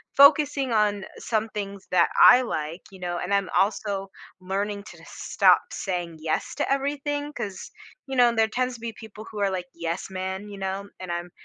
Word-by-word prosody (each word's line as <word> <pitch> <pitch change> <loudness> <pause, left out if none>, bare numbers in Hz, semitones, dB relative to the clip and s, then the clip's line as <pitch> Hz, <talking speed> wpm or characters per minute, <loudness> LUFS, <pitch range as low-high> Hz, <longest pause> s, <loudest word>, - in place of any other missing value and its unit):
focusing 280 -2 +5
on 205 -2 +2
some 220 -1 -1
things 200 -2 -5
that 180 -2 +4
I 250 0 +9
like, 160 -6 -4
you 190 - -13
know, 175 -1 -3
and 190 +3 -2
I'm 200 -1 +1
also 195 -1 0 0.3
learning 200 +2 -2
to - - -14
stop - - +3
saying 175 -4 -3
yes 155 0 -2
to - - -1
everything, 290 +1 -1
'cause, 195 -8 -6 0.4
you 270 - -4
know, 245 -1 +6
there 225 0 +4
tends 250 +3 -1
to - - -12
be 230 -1 -4
people 215 0 -11
who 215 - -6
are 200 -1 +2
like, 185 -2 -3
yes-men, 190 +4 -4
you 200 - -8
know, 195 +1 -3
and 185 -2 -6
I'm 175 +1 -4
200 Hz, 185 wpm, -25 LUFS, 185-235 Hz, 0.4 s, I